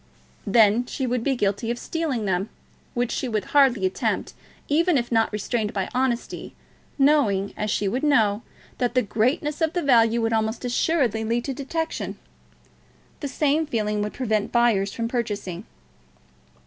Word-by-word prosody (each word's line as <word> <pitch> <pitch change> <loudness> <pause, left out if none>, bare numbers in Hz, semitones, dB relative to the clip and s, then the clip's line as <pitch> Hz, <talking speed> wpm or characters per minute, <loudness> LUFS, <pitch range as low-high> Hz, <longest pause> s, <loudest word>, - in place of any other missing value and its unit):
"Then 220 +3 +4
she 265 - -3
would 245 -1 -1
be 270 +1 +1
guilty 205 0 -1
of 240 - -1
stealing 285 -7 -2
them, 190 +1 -1 0.5
which 245 0 0
she 260 - -2
would 215 -4 -2
hardly 260 -8 +4
attempt, 185 - -1 0.3
even 330 +2 +3
if 240 -1 -2
not 225 -1 +2
restrained 210 +1 -2
by 195 -2 -2
honesty, 250 -2 -2 0.4
knowing, 270 -9 +3
as 210 - -2
she 205 -1 0
would 245 +7 -1
know, 225 -8 +3 0.4
that 245 0 0
the 255 - +4
greatness 265 - 0
of 320 +1 +1
the 350 - -1
value 235 -4 +4
would 225 0 0
almost 220 +2 -1
assuredly 245 -3 +1
lead 235 +2 -1
to 275 - -2
detection. 320 +4 -4 1.0
The 290 - -3
same 300 +3 +1
feeling 210 -5 -1
would 210 0 -3
prevent 220 -3 -1
buyers 225 -5 +2
from 230 -1 -3
purchasing." 210 -6 -3
235 Hz, 160 wpm, -24 LUFS, 210-270 Hz, 1.0 s, Then